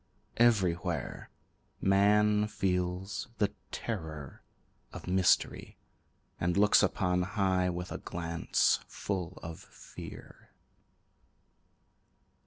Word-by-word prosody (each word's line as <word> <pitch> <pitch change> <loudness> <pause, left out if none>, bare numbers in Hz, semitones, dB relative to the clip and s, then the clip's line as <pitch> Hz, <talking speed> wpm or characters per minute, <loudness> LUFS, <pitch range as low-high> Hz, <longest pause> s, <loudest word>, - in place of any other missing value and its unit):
Everywhere, 95 -8 +1 0.5
Man 105 +2 +4
feels 95 -1 -2
the 105 -1 +1 0.2
terror 80 - -5 0.5
of - - -9
mystery, 90 0 +2 0.6
And 85 +2 0
looks 105 +1 +6
upon 90 -1 +1
high 95 -1 +1
with 90 0 -4
a - - -4
glance 85 -1 0
full 95 -3 -4
of 80 0 -7
fear. - - -12
95 Hz, 80 wpm, -31 LUFS, 90-100 Hz, 0.6 s, looks